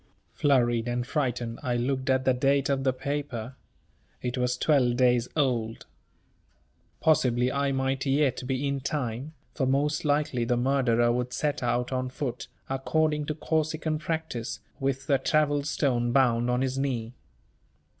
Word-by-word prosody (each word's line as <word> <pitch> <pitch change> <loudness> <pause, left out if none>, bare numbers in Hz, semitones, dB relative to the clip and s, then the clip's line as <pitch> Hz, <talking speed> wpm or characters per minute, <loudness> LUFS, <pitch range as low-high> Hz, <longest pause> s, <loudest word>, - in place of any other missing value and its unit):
Flurried 120 -5 +2
and 120 0 -1
frightened, 125 -5 -2
I 125 -4 -1
looked 130 +2 -1
at 130 0 +2
the 130 - +4
date 135 +2 +2
of 135 -1 +1
the 130 - +3
paper. 130 -3 -4 0.7
It 125 0 -2
was 125 -1 0
twelve 125 -4 +2
days 125 -1 +3
old. 120 -7 0 1.1
Possibly 125 -5 +3
I 140 0 0
might 135 +1 -1
yet 140 0 +2
be 135 +1 -1
in 140 0 -1
time, 135 +1 -3 0.2
for 130 - 0
most 145 +3 +1
likely 145 -4 +1
the 120 +1 +1
murderer 120 -2 +2
would 125 +1 -2
set 145 +2 -1
out 120 +1 0
on 130 0 -1
foot, 125 -1 -4 0.2
according 150 +3 0
to 155 - -2
Corsican 155 -1 -1
practice, 155 -7 -3 0.2
with 135 -1 -1
the 135 -1 +2
travel 145 +1 +2
stone 130 -4 0
bound 120 -2 +3
on 125 +1 +1
his 130 0 -1
knee. 125 -4 -2
130 Hz, 150 wpm, -27 LUFS, 125-145 Hz, 1.1 s, the